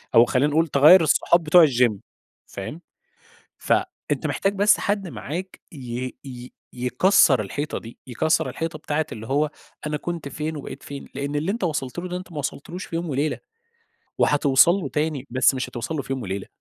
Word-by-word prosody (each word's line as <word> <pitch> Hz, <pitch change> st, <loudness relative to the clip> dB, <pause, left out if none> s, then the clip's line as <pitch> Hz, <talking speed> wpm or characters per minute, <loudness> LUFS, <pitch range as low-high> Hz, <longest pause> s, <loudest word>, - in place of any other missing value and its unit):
أو 115 Hz, +1 st, +8 dB
خلّينا 140 Hz, +5 st, +1 dB
نقول 160 Hz, +3 st, +2 dB
تغيّر 155 Hz, +6 st, +7 dB
الصحاب 170 Hz, +2 st, +3 dB
بتوع 160 Hz, +1 st, +7 dB
الGym 125 Hz, -4 st, +2 dB, 0.5 s
فاهم؟ 145 Hz, -, -7 dB, 0.8 s
فأنت -, -, -1 dB
محتاج 195 Hz, +1 st, -1 dB
بس 205 Hz, +1 st, +4 dB
حد 200 Hz, -2 st, -1 dB
معاك 180 Hz, +4 st, -6 dB
ي 125 Hz, -3 st, -6 dB
ي 125 Hz, -1 st, -9 dB, 0.2 s
يكَسّر 125 Hz, -, +3 dB
الحيطة 145 Hz, +9 st, -4 dB
دي، 115 Hz, +1 st, -12 dB
يكَسّر 145 Hz, +6 st, 0 dB
الحيطة 165 Hz, -1 st, -4 dB
بتاعة 155 Hz, 0 st, -2 dB
اللي 110 Hz, 0 st, -8 dB
هو 145 Hz, +2 st, +1 dB, 0.4 s
أنا 150 Hz, -, -1 dB
كنت 170 Hz, -1 st, -5 dB
فين 155 Hz, +2 st, -4 dB
وبقيت 140 Hz, -1 st, -8 dB
فين، 140 Hz, -1 st, -9 dB
لأن 140 Hz, +2 st, -3 dB
اللي 155 Hz, +6 st, -1 dB
أنت 225 Hz, -2 st, -3 dB
وصلت 150 Hz, -3 st, -3 dB
له 180 Hz, -, -4 dB
ده 180 Hz, -, -4 dB
أنت 180 Hz, 0 st, -9 dB
ما 155 Hz, -, -6 dB
وصلتلوش 155 Hz, +5 st, -5 dB
في 165 Hz, -, -5 dB
يوم 170 Hz, +1 st, -3 dB
وليلة، 145 Hz, +2 st, -1 dB, 0.8 s
وهتوصل 145 Hz, +1 st, +4 dB
له 185 Hz, -8 st, -3 dB
تاني، 150 Hz, -2 st, -2 dB
بس 130 Hz, +2 st, +3 dB
مش 130 Hz, -, -3 dB
هتوصل 120 Hz, +6 st, -5 dB
له 145 Hz, -, -1 dB
في 135 Hz, -, -4 dB
يوم 130 Hz, -, -4 dB
وليلة. 95 Hz, -2 st, -5 dB
150 Hz, 180 wpm, -23 LUFS, 130-165 Hz, 0.8 s, أو